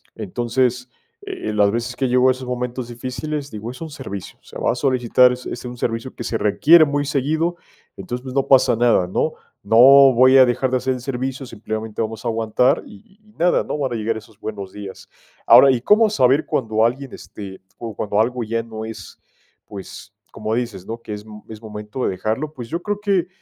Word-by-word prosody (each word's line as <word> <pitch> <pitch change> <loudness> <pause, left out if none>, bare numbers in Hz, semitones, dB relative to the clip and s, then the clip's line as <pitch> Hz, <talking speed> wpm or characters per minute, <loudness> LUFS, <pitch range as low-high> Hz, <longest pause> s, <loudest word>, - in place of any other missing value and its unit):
entonces, 120 +4 -1 0.4
eh, 385 - -5
las 105 -1 +3
veces 120 +2 -3
que 130 -1 -1
llego 125 +1 +4
a - - +6
esos 130 0 -9
momentos 125 0 -4
difíciles, 130 +5 -5
digo, 110 +2 -6
es 130 - -12
un 160 - -5
servicio, 130 - -8
o - - -41
sea, - - -10
va - - +1
a - - -6
solicitar 125 -2 +3
es 125 0 -6
es 120 - -6
un 125 0 -7
servicio 115 +2 -3
que 120 - -6
se 115 - -1
requiere 155 +11 +5
muy 145 0 -1
seguido, 155 +5 -1 0.4
entonces, 125 +1 -6
pues 130 0 -8
no 135 - +2
pasa 130 -3 +5
nada, 115 -6 +2
¿no?, 95 - -1 0.3
no 115 +3 +2 0.4
voy 130 +2 +6
a 130 - +8
dejar 125 +2 0
de 130 - +2
hacer 130 +1 -1
el 125 - -8
servicio, 130 +1 -4
simplemente 110 -1 -5
vamos 110 +1 -5
a 120 - +1
aguantar 115 +2 +1
y - - -13
y 210 +2 -28
y - - -23
nada, 175 +1 +2
¿no?, - - -4
van 135 -4 -2
a - - -2
llegar 110 0 -2
esos 105 -1 -14
buenos 100 -4 -7
días, 100 -2 -10 0.4
ahora, 135 - +8
¿y 125 - +1
cómo 215 - +4
saber 135 -6 +3
cuando 110 -3 0
alguien, 130 +3 -2
este, 95 -2 -10 0.2
o 115 -3 -6
cuando 105 0 -1
algo 120 +1 0
ya 115 +1 -2
no 110 -1 -8
es, 110 - -9 0.5
pues, 100 -2 -10 0.2
como 110 +1 -3
dices, 110 -7 -4
¿no?, 115 +1 -6
que 110 - -7
es 105 0 -7
m 105 -1 -12
es 110 0 -10
momento 105 +3 -7
de - - +1
dejarlo?, 110 +11 -3
pues 120 -6 -8
yo 170 +1 -3
creo 205 -1 -2
que 195 -4 +1
120 Hz, 220 wpm, -20 LUFS, 110-130 Hz, 0.5 s, a